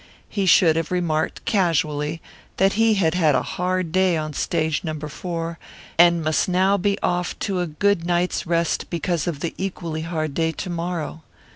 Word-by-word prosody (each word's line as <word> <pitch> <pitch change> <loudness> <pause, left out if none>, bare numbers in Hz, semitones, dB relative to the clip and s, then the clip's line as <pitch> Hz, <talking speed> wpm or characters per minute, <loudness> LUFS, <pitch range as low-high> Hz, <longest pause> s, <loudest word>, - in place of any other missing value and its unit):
He 195 -2 -1
should 165 -3 +5
have 165 -1 -1
remarked 170 -4 -1
casually 165 -5 0 0.4
that 195 0 +3
he 225 0 +3
had 165 -5 +2
had 160 -5 +3
a 125 - +1
hard 180 -1 -2
day 185 -1 +3
on 155 -1 -3
Stage 160 0 -1
Number 155 -2 -4
Four, 165 +1 -5 0.4
and 170 -1 +5
must 155 +5 +1
now 190 +2 +3
be 200 +1 0
off 175 0 -1
to 195 -2 -1
a 175 - -1
good 175 +3 +1
night's 175 0 0
rest 170 0 0
because 170 -2 -1
of 155 -4 -3
the 170 - -2
equally 170 -4 -3
hard 160 -3 -3
day 160 +2 0
to 185 - -5
morrow. 170 -2 -4
170 Hz, 175 wpm, -22 LUFS, 160-180 Hz, 0.4 s, should